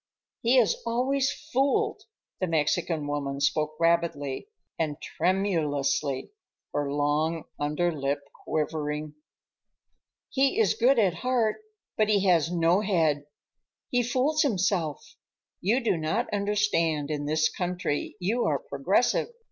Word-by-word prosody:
"He 240 +3 +4
is 235 -5 +3
always 260 +4 +1 0.2
fooled,"—the 270 - -1
Mexican 160 0 0
woman 140 -1 -3
spoke 155 +2 +1
rapidly 165 - 0 0.3
and 155 -2 -1
tremulously, 155 - 0 0.4
her 145 -1 -1
long 150 +3 0 0.2
under 150 +4 0
lip 140 -2 -2 0.2
quivering. 150 -1 -2 1.2
"He 275 +6 +2
is 445 - +4
good 255 +3 +3
at 195 -6 +3
heart, 230 +3 0 0.4
but 215 -1 +2
he 200 -2 +3
has 170 -3 +3
no 175 +2 +3
head. 160 -8 +1 0.6
He 245 - +3
fools 260 +6 +1
himself. 185 - -1 0.4
You 215 +8 +2
do 235 -7 +1
not 165 +11 -1
understand 200 -8 +1
in 145 -1 -2
this 155 +1 +2
country, 180 -4 -3
you 215 +7 0
are 145 - +2
progressive. 140 - +1
170 Hz, 115 wpm, -27 LUFS, 150-215 Hz, 1.2 s, He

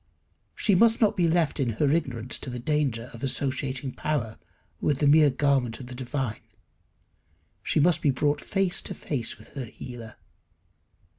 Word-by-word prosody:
She 210 - +2
must 225 +4 +5
not 215 -1 +3
be 175 -3 +2
left 165 -2 +1
in 125 -4 0
her 145 +7 +1
ignorance 130 -7 -2
to - - -6
the 125 - -5
danger 125 -3 -1
of 115 - -10
associating 135 0 -1
power 125 -9 -3 0.4
with 145 - +1
the 145 - +1
mere 150 +1 +6
garment 135 -4 +1
of 130 - -8
the 125 - -9
divine. 130 -2 -3 1.2
She - - 0
must 165 +1 +3
be 145 - +2
brought 145 +2 +1
face 195 -1 +1
to 190 - -6
face 125 -9 -3
with 110 - -16
her 135 -3 -6
healer. 115 -1 -9
135 Hz, 165 wpm, -26 LUFS, 125-155 Hz, 1.2 s, mere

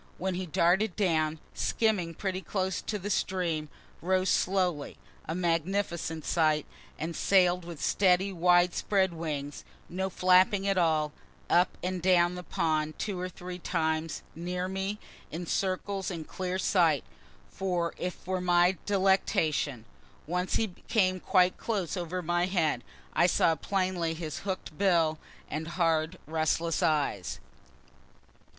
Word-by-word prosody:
Then 190 +1 -1
he 180 +1 -3
darted 175 +5 +2
down, 160 -5 +1 0.2
skimming 195 -7 0
pretty 190 0 -3
close 190 -1 -2
to 210 - -3
the 205 +1 -4
stream 170 -7 -1 0.3
rose 185 +2 +1
slowly, 180 -6 0 0.3
a 160 - -2
magnificent 170 -1 -1
sight, 155 -3 +2 0.3
and 165 +1 -4
sail'd 180 -2 +3
with 170 -3 -8
steady 190 0 +2
wide 175 0 +4
spread 190 -3 +1
wings, 150 -3 -4 0.3
no 190 +2 -2
flapping 185 +2 +4
at 195 - +2
all, 155 -3 +2 0.4
up 175 0 +3
and 185 0 -2
down 175 -1 +4
the 180 - -6
pond 155 -4 -1
two 200 -4 -3
or 185 0 -3
three 180 0 -8
times, 160 -2 -1
near 180 +2 -3
me, 190 +2 -3 0.3
in 170 +3 -5
circles 190 +2 -1
in 170 -4 -5
clear 185 +3 -3
sight, 170 -6 +3 0.5
as - - -20 0.4
if 180 0 -3
for 185 0 -3
my 180 +1 +3
delectation. 175 - +1 0.4
Once 180 +3 -1
he 220 - +1 0.2
came 185 -5 +2
quite 185 -1 +3
close 200 -7 -2
over 180 0 -3
my 175 +2 +1
head; 160 -9 0 0.3
I 175 - +4
saw 165 -1 +3
plainly 180 0 -1
his 160 -2 -5
hook'd 190 -5 -5
bill 165 -5 +3 0.3
and 155 +2 -4
hard 165 0 +1
restless 160 +1 0
eyes. 145 - 0
180 Hz, 135 wpm, -29 LUFS, 160-190 Hz, 0.5 s, wide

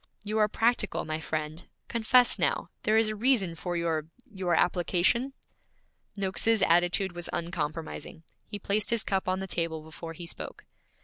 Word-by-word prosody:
'You 215 +1 -1
are 210 - +5
practical, 225 -1 +1
my 155 0 -2
friend. 155 +1 -4 0.2
Confess 240 +2 +4
now, - - 0
there 215 +1 +3
is 225 -1 +3
a 215 - -3
reason 215 -6 +2
for 175 +1 -3
your 160 -2 -1 0.3
your 185 -3 0
application?' 180 +10 +2 0.8
Noakes's 200 +2 +2
attitude 175 +3 +3
was 175 -1 -6
uncompromising. 165 -1 -4 0.2
He 205 - -5
placed 205 +1 -1
his 235 -2 +2
cup 190 -2 0
on 185 +1 0
the - - -3
table 165 -3 -2
before 165 +1 -8
he 170 +1 -8
spoke. 170 - -8
180 Hz, 160 wpm, -29 LUFS, 165-215 Hz, 0.8 s, are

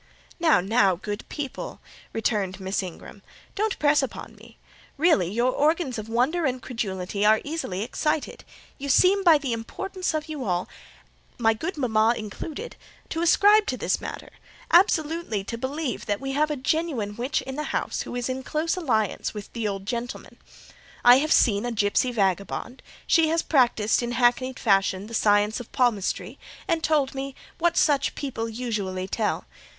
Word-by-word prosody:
"Now, 320 - +4
now, 195 -1 +3
good 205 +4 -6
people," 295 - -6 0.3
returned 205 -4 -1
Miss 190 +1 -1
Ingram, 185 +2 -9 0.3
"don't 425 0 -1
press 295 0 +3
upon 270 - -6
me. - - -17 0.4
Really 275 - +3
your 240 +4 +2
organs 290 -4 +1
of 215 +1 -7
wonder 260 +10 +1
and 255 -1 -2
credulity 200 -5 -3
are 215 +1 +5
easily 285 - -3
excited: 300 +5 -2 0.4
you 280 +1 -5
seem, 385 +7 +4
by 335 -4 +7
the 275 -5 -3
importance 365 - -4
of 310 0 -3
you 305 -4 -5
all—my 220 +4 -3
good 315 - -5
mama 230 -3 +2
included—ascribe 345 - 0
to - - -1
this - - -1
matter, - - -7 0.4
absolutely 325 - +3
to 230 - -5
believe 260 +2 -4
we 270 0 -4
have 300 +3 +1
a 300 - -1
genuine 265 -7 -1
witch 245 +5 -1
in 265 - -6
the 300 +1 -3
house, - - -2
who - - -6
is 245 -1 -2
in 260 0 -3
close 310 +6 -1
alliance 225 - -1
with 205 -1 -8
the 230 -3 -2
old 195 -1 -4
gentleman. 240 +3 -5 0.7
I 245 +1 +9
have 310 +2 -1
seen 205 -3 +4
a 245 - -2
gipsy 215 +3 +1
vagabond; 200 +3 -1 0.2
she 325 -1 +4
has 325 +1 +1
practised 240 -7 +2
in 240 0 -3
hackneyed 250 +2 +2
fashion 195 -3 +2
the 230 - -10
science 210 0 +2
of 245 - -10
palmistry 235 -7 0 0.3
and 330 -3 0
told 295 -4 +2
me 270 0 -5 0.2
what 340 0 +2
such 285 -3 +2
people 235 -5 -4
usually 210 -6 -3
tell. 215 +2 -1
250 Hz, 160 wpm, -25 LUFS, 215-305 Hz, 0.7 s, I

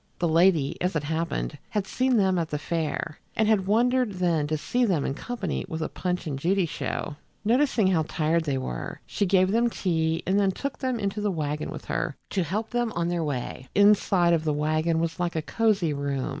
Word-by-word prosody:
The 175 - +1
lady, 165 -3 +3
as 180 0 0
it 150 - 0
happened, 155 - -2
had 210 -2 -1
seen 255 +3 +1
them 190 -3 +3
at 165 -1 -2
the 150 - -2
fair, 155 -1 -3 0.2
and 220 - +2
had 205 -4 +2
wondered 245 +1 +2
then 170 -5 +1
to 155 +1 0
see 245 +11 0
them 180 - +1
in - - -1
company 205 - -3
with 160 0 -3
a - - -3
Punch 180 -1 -3
and 140 -4 -3
Judy 185 +4 +2
show. 150 -1 -4 0.3
Noticing 245 -1 +3
how 175 -4 +2
tired 160 0 +1
they 140 -3 0
were, 60 - -5
she 200 - -1
gave 185 0 +3
them 235 +2 +3
tea 160 -6 0
and 195 +3 +2
then 200 -1 +3
took 280 +5 -4
them 255 -3 -1
into 200 0 -2
the 205 - +1
wagon 150 -4 -2
with - - -7
her 165 -3 -2 0.2
to 195 - +1
help 210 +7 -3
them 240 -2 0
on 170 0 -1
their 175 -1 -1
way. 130 -2 -4
The 205 - +5
inside 195 -4 +4
of 165 -2 +1
the 155 -1 +1
wagon 155 +2 +1
was 165 0 -1
like 175 -1 -1
a 160 - 0
cozy 200 -6 +1
room. 140 -2 -2
175 Hz, 220 wpm, -26 LUFS, 155-205 Hz, 0.3 s, The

